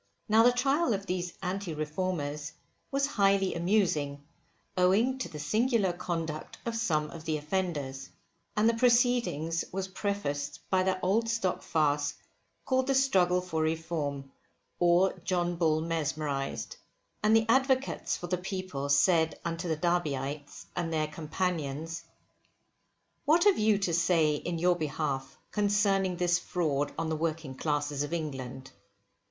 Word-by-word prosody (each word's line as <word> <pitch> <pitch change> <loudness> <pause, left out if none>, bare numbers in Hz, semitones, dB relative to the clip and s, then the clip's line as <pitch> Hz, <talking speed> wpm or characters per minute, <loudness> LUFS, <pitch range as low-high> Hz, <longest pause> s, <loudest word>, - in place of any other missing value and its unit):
Now 220 0 +5
the 245 +2 +6
trial 270 +1 +2
of 195 0 -6
these 180 -2 -3
Anti 185 -2 -3
Reformers 150 -2 -3 0.4
was 275 0 +1
highly 195 -7 +2
amusing, 170 -6 +1 0.5
owing 210 +9 +3
to - - -3
the 155 - -8
singular 215 - +1
conduct 165 -3 -4
of 230 -1 -2
some 155 -10 0
of 165 - -9
the 155 -1 0
offenders. 150 -5 -3 0.5
And 215 +1 +4
the 230 - +4
proceedings 235 - +2
was 190 0 -3
prefaced 150 -8 -3
by 185 -1 +4
that 185 0 0
old 220 +5 +2
stock 225 -5 0
farce 145 -2 +1 0.5
called 260 0 +1
the 275 - +2
Struggle 185 -9 +3
for 170 -3 -2
Reform, 155 -4 -2 0.5
or 175 +2 +4
John 175 -2 0
Bull 160 -2 +2
mesmerised. 150 -4 -2 0.4
And 215 +1 +4
the 225 0 +4
advocates 265 +2 +2
for - - -6
the 180 0 -1
people 185 -7 -4
said 160 +3 +3
unto 170 +1 -3
the 160 -2 0
Derbyites 150 -4 -2
and 170 -2 -2
their 155 -1 +1
companions, 160 -1 -3 1.2
what 320 +4 +5
have 410 -2 +4
you 215 -1 +4
to 195 -4 -1
say 165 -2 +3
in 170 +3 -3
your 175 +2 +3
behalf 145 -4 -3
concerning 200 -3 +2
this 175 0 +2
fraud 145 -5 -1
on 165 0 -1
the 160 - 0
working 160 -3 -2
classes 145 0 -1
of 145 +3 -3
England? 135 -5 -5
175 Hz, 140 wpm, -30 LUFS, 150-200 Hz, 1.2 s, the